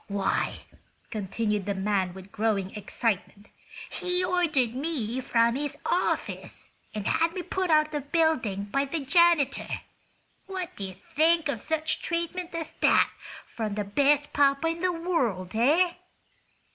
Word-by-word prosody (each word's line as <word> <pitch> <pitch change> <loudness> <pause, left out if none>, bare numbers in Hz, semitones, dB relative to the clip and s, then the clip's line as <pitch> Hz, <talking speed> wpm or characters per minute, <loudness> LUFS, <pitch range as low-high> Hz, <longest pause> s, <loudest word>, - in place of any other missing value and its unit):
"Why," 200 -2 -1 0.5
continued 210 0 -2
the 200 - 0
man, 190 -2 0
with 190 +1 -11
growing 200 -3 0
excitement, 210 0 -2 0.4
"he 360 0 0
ordered 310 -10 +1
me 260 -4 -2
from 235 -1 +3
his 290 +1 -3
office, 360 - -2 0.2
and 210 -2 -3
had 330 +1 +2
me 365 - -3
put 370 0 -2
out 305 -1 +5
of 305 - -14
the 295 -1 -2
building 285 - +1
by 275 +8 0
the 300 +3 -3
janitor! 335 -2 +3 0.7
What 370 -2 -4
do 200 - -4
you 190 -1 -7
think 320 - +2
of 280 -6 -2
such 315 +4 -1
treatment 340 +1 -3
as 325 -2 -3
that - - +4 0.3
from 215 -3 -4
the 210 - -1
'best 285 +8 +2
papa 280 +2 +3
in 330 +1 -3
the 365 0 +2
world,' 265 - -1
eh?" 305 +11 +4
280 Hz, 145 wpm, -27 LUFS, 210-330 Hz, 0.7 s, out